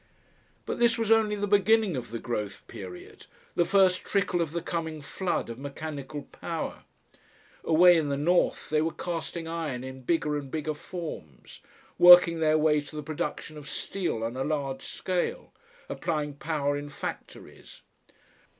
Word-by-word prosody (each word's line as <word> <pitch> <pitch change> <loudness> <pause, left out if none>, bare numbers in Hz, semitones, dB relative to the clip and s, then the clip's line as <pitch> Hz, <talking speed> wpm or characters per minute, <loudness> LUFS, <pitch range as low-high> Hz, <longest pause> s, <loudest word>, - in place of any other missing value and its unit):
But - - -4
this 235 0 +4
was 225 -1 0
only 220 -2 +4
the 205 0 -1
beginning 205 -1 +3
of 125 - -5
the 115 - -4
growth 105 -4 -4
period, 90 -2 -10 0.3
the 175 - +2
first 190 -2 +3
trickle 200 -3 0
of 160 -3 -1
the 170 +1 -2
coming 160 -2 -3
flood 175 +5 -2
of 115 +1 -7
mechanical 145 0 -6
power. - - -5 0.8
Away 175 +2 +6
in 155 -3 0
the 140 - 0
north 170 +3 +1
they 155 0 +3
were 160 +1 -1
casting 170 -1 -4
iron 160 -7 -3
in 130 0 -8
bigger 150 +1 0
and 140 -2 -9
bigger 155 +1 -2
forms, 150 - -8 0.4
working 175 -1 +9
their 155 -1 +3
way 150 -1 +3
to 145 - -12
the 150 - -4
production 155 0 -4
of 145 - -11
steel 175 -13 -3
on 115 +2 -3
a 130 - -1
large 140 -3 -2
scale, 180 -2 -3 0.3
applying 150 -4 -2
power 145 -1 -1
in 145 0 -5
factories. 145 - -8
155 Hz, 160 wpm, -28 LUFS, 145-175 Hz, 0.8 s, working